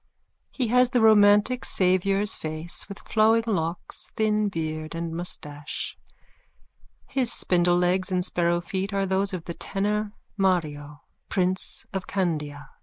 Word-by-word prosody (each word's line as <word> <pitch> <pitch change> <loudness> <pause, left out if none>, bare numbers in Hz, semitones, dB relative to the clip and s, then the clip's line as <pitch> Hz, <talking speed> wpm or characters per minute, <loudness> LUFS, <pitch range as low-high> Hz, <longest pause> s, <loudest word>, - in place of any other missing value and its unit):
He 250 -5 -2
has 250 +1 +4
the 250 -1 +2
romantic 210 +2 +5
Saviour's 195 +2 +2
face 155 +4 -5
with 200 - -10
flowing 225 +1 +4
locks, 170 -6 -3
thin 215 -1 +1
beard 155 -2 -4
and 165 0 -3
moustache. 150 -4 -4 1.1
His 260 -3 0
spindlelegs 180 +1 +2
and 180 -1 +1
sparrow 175 -1 +1
feet 190 +3 -3
are 195 0 +1
those 195 +1 +2
of 180 -3 -5
the 170 - -5
tenor 210 +3 -2 0.2
Mario, 150 -6 -1 0.3
prince 185 -1 -1
of 190 -1 -3
Candia. 150 -7 -2
185 Hz, 125 wpm, -26 LUFS, 170-205 Hz, 1.1 s, romantic